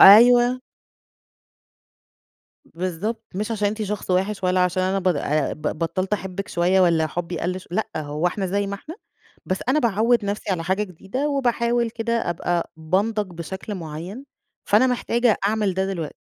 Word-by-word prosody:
أيوه. 240 Hz, +5 st, +8 dB, 2.0 s
بالضبط، 185 Hz, +6 st, -4 dB
مش 210 Hz, +3 st, -2 dB
عشان 210 Hz, -2 st, +1 dB
أنتِ 215 Hz, +1 st, -3 dB
شخص 205 Hz, -1 st, -4 dB
وِحِش، 195 Hz, +2 st, 0 dB
ولا 185 Hz, 0 st, +3 dB
عشان 185 Hz, +1 st, 0 dB
أنا 190 Hz, +1 st, +1 dB
ب 190 Hz, -, -5 dB
أ 150 Hz, -3 st, 0 dB
ب -, -, -9 dB, 0.2 s
بطّلت 185 Hz, +4 st, -2 dB
أحبِّك 195 Hz, -1 st, -3 dB
شوية، 180 Hz, +2 st, +2 dB
والّا 165 Hz, -3 st, +4 dB
حُبّي 175 Hz, +1 st, -4 dB
قلّ 185 Hz, +2 st, -2 dB
ش -, -, -17 dB
لأ، 220 Hz, +5 st, -1 dB
هو 150 Hz, +2 st, -1 dB
إحنا 195 Hz, +2 st, -1 dB
زي 200 Hz, +2 st, 0 dB
ما 200 Hz, -, -3 dB
إحنا، 305 Hz, +11 st, -9 dB, 0.5 s
بس 185 Hz, -, 0 dB
أنا 290 Hz, +4 st, +4 dB
باعوّد 230 Hz, -1 st, +2 dB
نفسي 205 Hz, 0 st, -3 dB
على 170 Hz, -3 st, -1 dB
حاجة 190 Hz, +4 st, +1 dB
جديدة، 205 Hz, -, -3 dB
وباحاول 240 Hz, -3 st, +1 dB
كده 230 Hz, 0 st, -3 dB, 0.2 s
أبقى 175 Hz, 0 st, -1 dB
بانضج 200 Hz, +6 st, 0 dB
بشكل 190 Hz, +5 st, -6 dB
معين. 175 Hz, -, -7 dB, 0.4 s
فأنا 215 Hz, +5 st, +4 dB
محتاجة 240 Hz, -2 st, +2 dB
أعمل 210 Hz, -2 st, +1 dB
ده 190 Hz, +1 st, 0 dB
دلوقتي. 170 Hz, -6 st, -4 dB
195 Hz, 160 wpm, -23 LUFS, 180-220 Hz, 2.0 s, أيوه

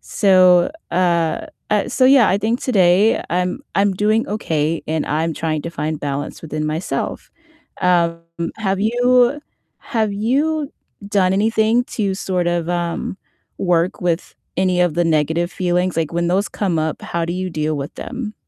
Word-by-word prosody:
So, 185 Hz, -2 st, +4 dB, 0.2 s
uh 170 Hz, -3 st, +1 dB, 0.3 s
uh, 210 Hz, -1 st, +1 dB
so 260 Hz, -, +2 dB
yeah, 265 Hz, -4 st, +6 dB
I -, -, +1 dB
think 225 Hz, +4 st, -1 dB
today 200 Hz, -2 st, +3 dB
I'm 180 Hz, +1 st, +1 dB, 0.2 s
I'm 200 Hz, 0 st, +3 dB
doing 220 Hz, +2 st, +2 dB
okay 160 Hz, -6 st, -1 dB
and 160 Hz, 0 st, 0 dB
I'm 160 Hz, +2 st, -1 dB
trying 155 Hz, -2 st, -2 dB
to 170 Hz, -, -5 dB
find 155 Hz, -1 st, -3 dB
balance 145 Hz, 0 st, -4 dB
within 155 Hz, -1 st, -4 dB
myself. 155 Hz, +4 st, -3 dB, 0.5 s
Um, 170 Hz, -2 st, +2 dB, 0.4 s
have 195 Hz, -3 st, -1 dB
you 245 Hz, +4 st, +3 dB, 0.4 s
have 220 Hz, -4 st, -1 dB
you 280 Hz, +8 st, 0 dB, 0.4 s
done 190 Hz, -2 st, +2 dB
anything 220 Hz, +3 st, +2 dB
to 200 Hz, -4 st, 0 dB
sort 185 Hz, -2 st, -2 dB
of, 175 Hz, -1 st, -1 dB
um, 175 Hz, +1 st, -2 dB, 0.4 s
work 175 Hz, -1 st, +1 dB
with 175 Hz, -1 st, -2 dB, 0.2 s
any 185 Hz, 0 st, +1 dB
of 175 Hz, -3 st, +2 dB
the 175 Hz, +1 st, +1 dB
negative 165 Hz, +2 st, +1 dB
feelings? 180 Hz, 0 st, 0 dB
Like, 165 Hz, -1 st, -1 dB
when 170 Hz, 0 st, 0 dB
those 195 Hz, +3 st, +1 dB
come 185 Hz, -6 st, -1 dB
up, 155 Hz, 0 st, -2 dB
how 170 Hz, 0 st, -2 dB
do 170 Hz, -, -3 dB
you 185 Hz, 0 st, -3 dB
deal 155 Hz, -1 st, -1 dB
with 140 Hz, 0 st, -5 dB
them? 245 Hz, -5 st, -6 dB
180 Hz, 160 wpm, -19 LUFS, 165-210 Hz, 0.5 s, yeah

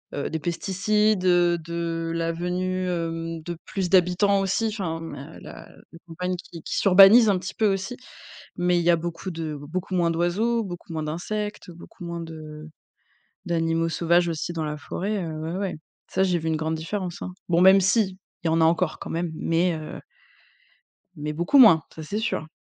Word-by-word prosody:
heu, 145 Hz, -, -2 dB
des 160 Hz, -, -2 dB
pesticides, 195 Hz, +4 st, 0 dB
heu, 175 Hz, -1 st, +3 dB
de 165 Hz, 0 st, -3 dB
la 165 Hz, 0 st, 0 dB
venue, 180 Hz, +2 st, -2 dB
hem, 165 Hz, -1 st, -3 dB
de 175 Hz, +1 st, -5 dB
plus 190 Hz, -3 st, -3 dB
d'habitants 190 Hz, +2 st, +4 dB
aussi, 195 Hz, +4 st, 0 dB
enfin, 190 Hz, -7 st, -3 dB
hem, 165 Hz, -2 st, -9 dB
la -, -, -11 dB, 0.2 s
une 165 Hz, -, -13 dB
campagne 180 Hz, +2 st, -3 dB
qui 170 Hz, -2 st, -10 dB
qui -, -, -5 dB
s'urbanise 200 Hz, +4 st, +8 dB
un 195 Hz, -, +3 dB
petit 185 Hz, +1 st, -6 dB
peu 215 Hz, -2 st, +2 dB
aussi 195 Hz, +5 st, -3 dB, 0.6 s
mais 175 Hz, 0 st, +2 dB
il -, -, -1 dB
y 170 Hz, -, +2 dB
a 170 Hz, -, +6 dB
beaucoup 170 Hz, +2 st, -5 dB
de, 160 Hz, -3 st, -4 dB
beau 145 Hz, 0 st, -9 dB
beaucoup 185 Hz, +4 st, -4 dB
moins 175 Hz, -2 st, +2 dB
d'oiseaux, 195 Hz, +8 st, +1 dB
beaucoup 175 Hz, -3 st, -8 dB
moins 155 Hz, -1 st, -3 dB
d'insectes, 210 Hz, +7 st, -4 dB
beaucoup 175 Hz, +2 st, -12 dB
moins 170 Hz, 0 st, -5 dB
de 155 Hz, -1 st, -9 dB, 0.8 s
d'animaux 165 Hz, -1 st, 0 dB
sauvages 170 Hz, +1 st, +2 dB
aussi 165 Hz, +1 st, -3 dB
dans 160 Hz, -2 st, -2 dB
la 150 Hz, 0 st, -3 dB
forêt, 200 Hz, +7 st, -3 dB
heu, 165 Hz, -, -4 dB
ouais 165 Hz, +3 st, -4 dB
ouais. 195 Hz, -1 st, -2 dB, 0.3 s
Ça 190 Hz, -, +1 dB
j'ai 180 Hz, -2 st, +2 dB
vu 160 Hz, -, -5 dB
une 160 Hz, -, 0 dB
grande 160 Hz, +1 st, -2 dB
différence 175 Hz, +2 st, -4 dB
hein. 185 Hz, -, -5 dB, 0.2 s
Bon, 175 Hz, 0 st, +2 dB
même 190 Hz, +1 st, +8 dB
si, 190 Hz, 0 st, +2 dB, 0.3 s
il -, -, 0 dB
y -, -, +2 dB
en 165 Hz, +1 st, +2 dB
a -, -, +6 dB
encore 165 Hz, 0 st, +1 dB
quand -, -, -7 dB
même, 170 Hz, 0 st, -2 dB
mais 165 Hz, +2 st, +1 dB
heu 155 Hz, -1 st, -7 dB, 1.2 s
mais 150 Hz, -2 st, -4 dB
beaucoup 175 Hz, -, +2 dB
moins, 170 Hz, -11 st, +8 dB
ça, 160 Hz, -, -8 dB
c'est 200 Hz, +7 st, -3 dB
sûr. 220 Hz, -8 st, -2 dB
175 Hz, 195 wpm, -25 LUFS, 165-190 Hz, 1.2 s, s'urbanise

